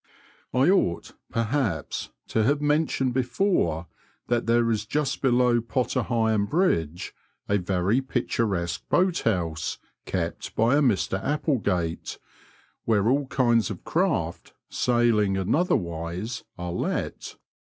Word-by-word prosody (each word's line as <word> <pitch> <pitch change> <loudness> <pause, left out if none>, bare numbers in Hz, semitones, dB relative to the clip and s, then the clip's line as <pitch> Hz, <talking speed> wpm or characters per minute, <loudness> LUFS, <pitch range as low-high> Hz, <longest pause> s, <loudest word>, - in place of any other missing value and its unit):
I 130 +4 +3
ought, 85 - +1 0.2
perhaps, 115 - -1 0.2
to 110 - +1
have 145 +7 +2
mentioned 145 -3 +1
before 120 - +1 0.4
that 120 -1 +1
there 115 0 +3
is 110 -1 -1
just 140 +1 -1
below 125 -2 +3
Potter 120 +2 -1
Heigham 110 -3 +1
Bridge 90 - 0 0.3
a 100 0 +2
very 95 +6 +1
picturesque 105 -9 -1
boat 180 -1 +2
house, 85 -7 -1 0.3
kept 85 -3 -3
by 115 +5 +3
a - - +3
Mr 95 - +1
Applegate, 110 - -1 0.7
where 105 -2 +2
all 140 +1 +1
kinds 120 -6 +2
of - - -7
craft, - - -1 0.2
sailing 115 -5 +2
and 95 +5 +1
otherwise, 90 - -2
are 90 -1 -4
let. - - -3
115 Hz, 120 wpm, -26 LUFS, 90-130 Hz, 0.7 s, I